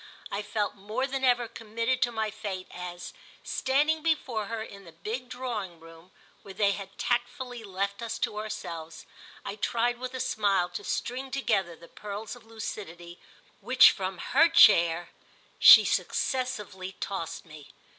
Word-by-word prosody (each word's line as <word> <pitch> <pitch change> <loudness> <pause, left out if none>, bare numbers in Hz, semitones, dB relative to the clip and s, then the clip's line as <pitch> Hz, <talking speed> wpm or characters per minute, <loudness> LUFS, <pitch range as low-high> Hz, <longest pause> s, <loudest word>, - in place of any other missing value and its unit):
I 200 - -2
felt 210 0 -2
more 215 +6 -3
than 270 0 -4
ever 245 -2 +3
committed 230 +3 -2
to 240 - +2
my 220 -2 -2
fate 195 -3 -5
as, 175 0 -7 0.3
standing 295 +4 +1
before 260 -10 -1
her 225 0 -4
in 200 -2 -11
the 170 - -13
big 220 +10 -6
drawing 215 -10 -5
room 165 +2 -15 0.3
where 195 -1 -11
they 200 -1 +3
had 195 -1 -7
tactfully 245 0 -2
left 200 +1 -3
us 230 -1 -4
to 210 - -2
ourselves, 170 -7 -6 0.4
I 205 - -5
tried 240 +3 0
with 255 0 -5
a - - -4
smile 200 -6 +1
to 175 - -6
string 260 +2 -3
together 215 -10 0
the 170 - -15
pearls 210 +5 -7
of 235 -2 -17
lucidity 175 -6 -7 0.4
which, 255 +1 +7
from 190 -1 -4
her 315 - +3
chair, 170 - +6 0.5
she - - +10
successively 210 -8 -2
tossed 165 -4 -5
me. 150 -3 -13
215 Hz, 155 wpm, -28 LUFS, 185-245 Hz, 0.5 s, she